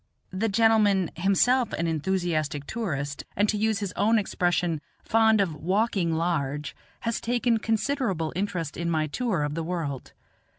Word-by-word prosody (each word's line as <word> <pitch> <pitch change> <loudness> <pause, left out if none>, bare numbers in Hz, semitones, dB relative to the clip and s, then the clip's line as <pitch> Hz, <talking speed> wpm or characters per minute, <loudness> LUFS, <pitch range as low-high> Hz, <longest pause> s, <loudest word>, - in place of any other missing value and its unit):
The 200 +4 -1
gentleman 210 -4 +3
himself, 200 +8 +2
an 170 - -1
enthusiastic 160 -3 -1
tourist, 145 -11 -3
and 205 +2 +2
to - - +1
use 220 0 0
his 195 -3 -3
own 225 +2 +3
expression, 175 -5 0 0.2
fond 220 -1 +4
of 190 -5 +1
"walking 185 +1 0
large," 150 -4 -1 0.3
has 230 -1 -2
taken 240 -1 +1
considerable 225 - -1
interest 180 -5 -3
in 170 0 -2
my 155 -2 +1
tour 185 - -1
of 145 0 -2
the 165 - -2
world. 160 -6 -4
185 Hz, 145 wpm, -26 LUFS, 160-220 Hz, 0.3 s, fond